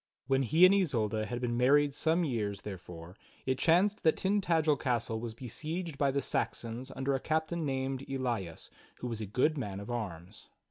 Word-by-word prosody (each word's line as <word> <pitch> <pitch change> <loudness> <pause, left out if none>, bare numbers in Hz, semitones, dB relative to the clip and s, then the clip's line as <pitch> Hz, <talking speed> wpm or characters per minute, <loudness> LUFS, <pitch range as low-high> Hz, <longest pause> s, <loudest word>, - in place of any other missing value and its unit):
When 135 +1 +2
he 160 +8 +6
and 185 - +7
Isolda 110 - +1
had 120 0 -4
been 120 -1 -1
married 140 +4 +4
some 165 +4 +1
years, 105 - -2
therefore, 90 -3 -8 0.3
it 130 -1 0
chanced 195 +6 +3
that 160 - +4
Tintagel 170 -6 +2
castle 115 -3 -1
was 115 -1 -6
besieged 155 - -5
by 140 - +3
the 140 +1 0
Saxons 120 +1 -3
under 135 +1 0
a 135 - +1
captain 160 +2 -1
named 135 0 -2
Elias 120 -11 -3 0.2
who - - -8
was 115 -3 -3
a 105 - -4
good 135 +9 +1
man 100 -6 -4
of 100 +4 -7
arms. 100 -4 -6
130 Hz, 180 wpm, -31 LUFS, 110-155 Hz, 0.3 s, and